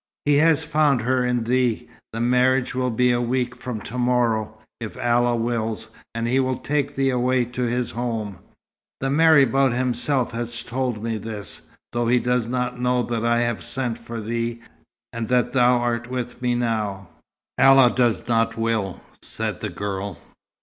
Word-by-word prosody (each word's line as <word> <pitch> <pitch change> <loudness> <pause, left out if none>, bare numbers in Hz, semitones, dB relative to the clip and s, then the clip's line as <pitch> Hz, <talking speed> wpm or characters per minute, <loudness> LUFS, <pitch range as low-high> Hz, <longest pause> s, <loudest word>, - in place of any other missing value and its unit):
"He 145 -1 +4
has 160 0 +4
found 150 -4 +2
her 125 +2 +1
in 125 -1 0
thee. 125 -1 0 0.2
The 115 - -5
marriage 125 +2 +2
will 125 0 0
be 125 +2 +2
a 120 0 +1
week 125 +1 -1
from 125 -2 -5
to 125 +5 -6
morrow, 115 -3 +1 0.2
if 115 +1 -7
Allah 120 -1 +2
wills, 115 -2 -2 0.2
and 115 0 -1
he 130 +3 +2
will 130 -1 0
take 145 -1 -2
thee 135 0 +2
away 125 0 +1
to 125 +1 -6
his 120 0 -1
home. 115 -5 -3 0.6
The 135 0 -1
marabout 140 -4 +4
himself 125 +1 0
has 120 0 -4
told 125 -3 -3
me 115 -1 -2
this, 105 -1 -6 0.3
though 120 0 0
he 125 +2 +4
does 125 -1 0
not 125 0 -2
know 125 0 +1
that 115 -2 -2
I 120 0 +2
have 120 -1 -1
sent 125 -4 -2
for 115 0 -7
thee, 115 +1 -3 0.5
and 115 -1 -3
that 125 0 +2
thou 125 -1 +4
art 120 0 -1
with 125 -1 -5
me 125 -1 +1
now." 105 -6 -2 0.5
"Allah 135 -2 +7
does 120 -3 +1
not 115 -1 +1
will," 115 -5 -1 0.2
said - - -4
the - - -3
girl. 100 -2 -4
120 Hz, 170 wpm, -23 LUFS, 115-125 Hz, 0.6 s, Allah